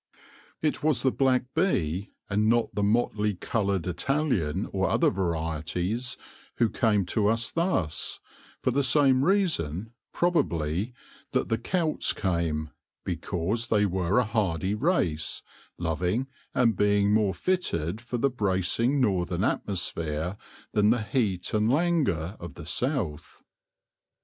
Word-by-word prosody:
It 155 - 0
was 155 -3 +2
the 130 - +3
black 130 -1 +2
bee, 100 - 0 0.2
and 105 +2 +1
not 115 0 +2
the 105 - -1
motley 105 -1 +1
coloured 100 -2 -1
Italian 95 - 0
or 95 -2 +1
other - - +3
varieties, 90 - -2 0.4
who 115 -3 +2
came 105 -4 +2
to 105 +3 +1
us 115 +3 +1
thus, 165 - -1 0.4
for 130 - +2
the 140 +3 +2
same 135 0 +4
reason, 115 - 0 0.2
probably, 110 - 0 0.4
that - - 0
the 115 - +1
Celts 160 +5 0
came 85 -5 -1 0.2
— - - -58
because 95 +6 -1
they 105 -3 +3
were 95 +1 0
a 125 - +5
hardy 95 -4 0
race, 105 - 0 0.3
loving, 90 - -1 0.3
and 115 -4 +3
being 100 +1 +3
more 105 -4 +2
fitted 105 - -1
for 120 +1 -4
the 140 +3 +1
bracing 110 +5 +1
northern 95 -6 +1
atmosphere 85 -4 -1 0.4
than 105 0 +3
the 115 -1 +2
heat 100 -5 -1
and 110 +1 +2
languor 135 - +1
of 85 -5 -8
the - - -9
south. 85 - -2
105 Hz, 130 wpm, -27 LUFS, 90-125 Hz, 0.4 s, a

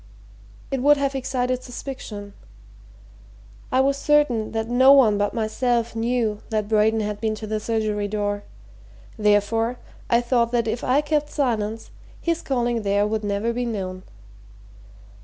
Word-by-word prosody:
"It 270 -2 -1
would 290 +2 +5
have 280 -1 0
excited 255 -1 -1
suspicion. 235 -6 -8 1.4
I 260 - +4
was 275 +1 +1
certain 285 -8 +2
that 220 0 -2
no 260 +3 +6
one 225 -7 +5
but 205 +3 0
myself 235 +1 0
knew 225 -2 0
that 215 -2 -1
Braden 220 +1 +2
had 210 0 -4
been 220 -1 0
to 215 - -7
the 215 0 -2
surgery 215 -2 -1
door 205 0 -2 0.7
therefore, 215 +3 +1 0.3
I 235 - +4
thought 240 -1 +1
that 235 -1 +1
if 225 +2 -2
I 270 +4 +3
kept 295 0 -1
silence, 225 -6 -2 0.3
his 335 -1 -1
calling 240 -3 -1
there 205 0 +1
would 215 0 -2
never 205 +3 -1
be 245 +1 -2
known. 185 -4 -4
225 Hz, 145 wpm, -23 LUFS, 210-255 Hz, 1.4 s, no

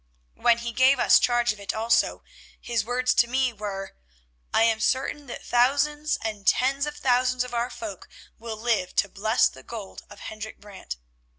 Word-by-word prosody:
When 235 -1 +3
he 235 0 -4
gave 260 +3 +4
us 240 - +6
charge 240 -1 +2
of 210 - -15
it 200 +1 -4
also, 225 +1 +1 0.4
his 235 -3 -1
words 250 +2 +1
to 235 - +4
me 255 0 +1
were: 200 -2 -6 0.6
'I - - +4
am 225 -1 +3
certain 275 +5 -1
that 240 - -8
thousands 285 +5 +2
and 210 -3 -5
tens 275 +3 +2
of 295 - -5
thousands 250 -1 +2
of 250 -1 -9
our 240 +1 0
folk 210 -7 -8 0.3
will 225 -1 -6
live 220 -5 -1
to - - +3
bless 215 +4 +2
the 130 - -11
gold 210 - -8
of - - -13
Hendrik 215 0 -8
Brant. 195 - -8
235 Hz, 180 wpm, -25 LUFS, 215-255 Hz, 0.6 s, us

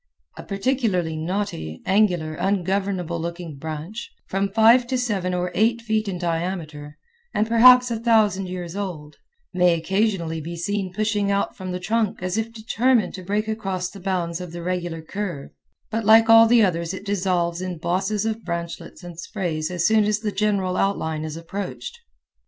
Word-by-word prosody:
A - - -8
particularly 195 -6 -1
knotty, 155 - -3
angular, 180 -6 +2
ungovernable 190 -1 -1
looking 170 -3 -6
branch, 160 +8 -6 0.2
from 195 +1 -1
five 230 +3 +5
to 260 +1 0
seven 205 -7 -1
or 180 0 -1
eight 230 +3 +2
feet 220 -2 -1
in 190 -2 -3
diameter 165 -4 -4 0.4
and 215 - +2
perhaps 250 +2 +7
a 230 - -1
thousand 215 -5 +3
years 180 -1 -6
old, 170 -7 -5 0.4
may 180 -1 +4
occasionally 170 -2 -1
be 170 +3 -6
seen 195 +2 -2
pushing 210 0 0
out 200 0 0
from 185 -1 -6
the 180 - -3
trunk 215 +1 -1
as 185 +1 -1
if 225 +1 -2
determined 230 +2 +1
to 185 - -7
break 205 +4 -1
across 190 -4 -3
the 200 - -11
bounds 180 -2 -2
of 180 -2 -7
the 170 0 -6
regular 175 -2 -3
curve, 175 -5 -5 0.4
but 225 +1 -1
like 225 +1 +6
all 225 0 +9
the 235 -1 +5
others 170 -1 0
it 200 - -9
dissolves 180 -3 0
in 185 -2 -4
bosses 190 +6 -1
of 225 0 -2
branchlets 170 +1 -5
and 175 -2 -9
sprays 170 -5 -3
as 175 -1 -1
soon 220 -1 +4
as 210 0 0
the 215 -2 -1
general 195 -3 0
outline 160 -6 0
is 155 0 -5
approached. 195 - -6
190 Hz, 170 wpm, -23 LUFS, 170-215 Hz, 0.4 s, all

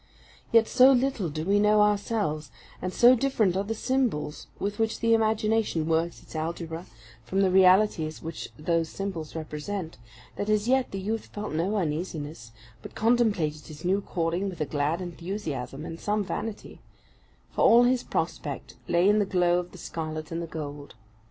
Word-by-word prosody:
Yet 230 -1 +5
so 255 +1 +6
little, 250 -8 0
do 155 +2 -4
we 200 +2 +3
know 210 0 +5
ourselves, 200 - 0 0.3
and 185 - -2
so 240 +6 +7
different 225 -8 +1
are 195 - +1
the 225 +2 -3
symbols 230 - -1
with 205 +1 -3
which 225 -1 0
the 230 0 +3
imagination 220 -5 +1
works 165 +1 0
its - - -14
algebra, 165 +1 -4 0.4
from 190 - 0
the 190 -2 +3
realities 185 -4 +4
which 165 0 -6
those 165 +1 0
symbols 180 -6 -5
represent, 160 - -5 0.4
that 205 - -2
as 215 +1 +2
yet 260 0 +2
the 195 - -5
youth 220 +4 -3
felt 210 -3 -6
no 180 +7 0
uneasiness, 155 - -4 0.3
but - - -11
contemplated 210 -10 +1
his 155 +1 -10
new 195 +3 +2
calling 175 +2 -1
with 180 - -9
a 155 - 0
glad 150 +4 -1
enthusiasm 165 - -5
and 165 0 -7
some 210 0 0
vanity; 210 +2 -5 0.7
for - - -2
all 235 +1 +7
his 250 0 +3
prospect - - -3
lay 175 +2 +3
in 210 +1 +5
the - - +4
glow 180 -2 +2
of 180 0 -6
the - - -12
scarlet 155 -2 -5
and 165 +1 -2
the 170 - -5
gold. 145 -2 -7
185 Hz, 170 wpm, -27 LUFS, 160-215 Hz, 0.7 s, so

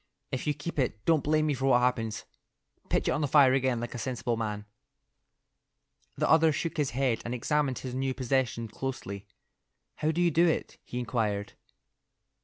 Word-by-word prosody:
If 130 +2 -3
you 150 - +1
keep 150 +1 -5
it, 115 -5 -1
don't 160 -4 +3
blame 155 +1 +2
me 150 - +1
for 135 0 -2
what 125 -2 +5
happens. 115 -3 0 0.6
Pitch - - +1
it - - +3
on - - 0
the 145 - +1
fire 135 -2 +6
again 130 -2 +1
like 120 0 -5
a 120 - -5
sensible 120 0 -2
man." 105 -2 -3 1.5
The - - +1
other 160 0 +5
shook 165 +3 -3
his 145 -3 +1
head 130 -5 +1
and 120 +1 -3
examined 140 +1 0
his 130 -2 -6
new 130 0 -1
possession 125 -3 0
closely. 105 -4 -5 0.7
"How 155 - 0
do 160 +2 0
you 175 -1 +3
do 170 +3 +4
it?" 160 - -2
he 125 - -7
inquired. 110 -5 -1
130 Hz, 185 wpm, -29 LUFS, 115-150 Hz, 1.5 s, fire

